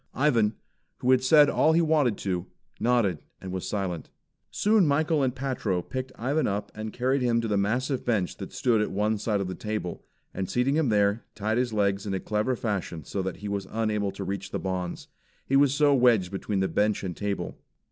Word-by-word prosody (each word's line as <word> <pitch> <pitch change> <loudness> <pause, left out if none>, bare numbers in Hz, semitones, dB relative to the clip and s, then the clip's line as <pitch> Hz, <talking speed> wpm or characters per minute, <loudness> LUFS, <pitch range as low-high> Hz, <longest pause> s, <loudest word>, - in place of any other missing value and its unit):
Ivan, 115 -7 +2 0.4
who 125 - +1
had 130 -1 +4
said 145 +2 +7
all 160 - +3
he 165 - +4
wanted 150 -9 +2
to, 90 -3 -3 0.3
nodded 115 -9 +2 0.2
and 95 - -7
was 95 -1 -4
silent. 95 -6 -3 0.4
Soon 210 -4 +3
Michael 155 +1 +2
and 130 -2 0
Patro 120 -9 -1
picked 130 0 -5
Ivan 140 +7 0
up 100 0 -3
and 110 0 -5
carried 130 +4 0
him 120 -2 +2
to 115 - -2
the 105 - 0
massive 120 +7 0
bench 105 -7 0
that - - -7
stood 115 -4 +2
at 105 - 0
one 105 +2 0
side 105 -1 0
of 95 - -2
the 95 - -4
table, 105 -2 -4 0.3
and 95 -1 -3
seating 125 +3 +1
him 155 -5 +2
there, 105 +1 +2
tied 110 +3 0
his 125 -2 0
legs 100 -1 0
in 100 - -1
a - - -1
clever 110 +6 0
fashion 100 -8 -3
so 95 - -3
that 95 -1 -4
he - - -2
was 100 -1 -3
unable 105 -2 0
to 100 - -6
reach 100 +1 -4
the - - -3
bonds, 90 -2 -4 0.4
he 135 - 0
was 140 -1 +5
so 145 0 +4
wedged 120 -8 +4
between 100 0 -2
the 95 - +2
bench 105 +1 +1
and 90 -3 -4
table. 100 -1 -3
110 Hz, 210 wpm, -27 LUFS, 100-130 Hz, 0.4 s, said